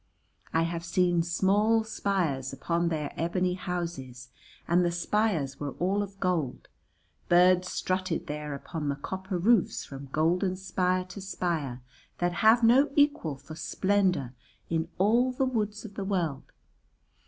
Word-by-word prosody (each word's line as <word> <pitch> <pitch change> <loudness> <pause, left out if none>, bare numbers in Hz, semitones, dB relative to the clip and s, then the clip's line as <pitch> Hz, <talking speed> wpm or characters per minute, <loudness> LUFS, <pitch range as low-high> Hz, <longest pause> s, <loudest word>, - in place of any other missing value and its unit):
I 165 - +2
have 165 0 -3
seen 175 0 +2
small 200 +6 +2
spires 185 - -1
upon 170 +5 -1
their 155 -3 -3
ebony 180 +2 0
houses 170 -9 -5 0.4
and 175 +2 +3
the 175 - +1
spires 175 -6 0
were 145 -2 -4
all 195 +3 0
of 195 -1 -7
gold, 170 -9 -1 0.6
birds 180 +1 +5
strutted 185 -2 -1
there 150 -1 -4
upon 150 +1 -4
the 140 - 0
copper 190 +6 -4
roofs 205 +2 +2
from 135 0 -9
golden 180 +5 +1
spire 185 -1 0
to 195 +2 -9
spire 160 -10 -3 0.3
that 175 0 0
have 225 +2 +6
no 255 +6 +6
equal 285 - +2
for 145 +3 -11
splendour 185 -6 0 0.4
in 165 0 0
all 235 +7 +3
the 265 +1 +1
woods 215 -4 -2
of 210 - -9
the 195 - -4
world. 170 -8 -2
180 Hz, 140 wpm, -28 LUFS, 160-200 Hz, 0.6 s, have